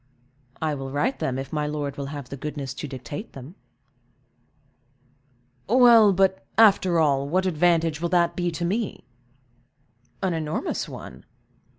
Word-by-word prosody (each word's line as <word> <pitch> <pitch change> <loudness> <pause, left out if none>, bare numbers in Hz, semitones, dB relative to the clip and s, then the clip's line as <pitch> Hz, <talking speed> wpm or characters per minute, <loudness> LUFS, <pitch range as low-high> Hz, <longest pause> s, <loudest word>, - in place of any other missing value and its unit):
"I 155 -1 -1
will 135 -1 -5
write 145 - -1
them, 130 -1 -2
if 135 +2 -6
my 150 -1 -1
lord 145 -2 -3
will 140 -1 -5
have 140 -3 -7
the - - -6
goodness 140 0 -5
to 150 - -6
dictate 135 - -8
them." 135 +5 -10 2.2
"Well, 235 -3 +7
but, 190 0 +1
after 195 -5 +5
all, 140 -3 +1
what 185 +4 +1
advantage 165 -2 +1
will 170 - -1
that 175 -1 +2
be 175 -1 -1
to 170 +1 -3
me?" 210 +5 -2 1.2
"An 185 -2 +1
enormous 155 -1 -3
one. 65 - -10
160 Hz, 145 wpm, -24 LUFS, 140-185 Hz, 2.2 s, Well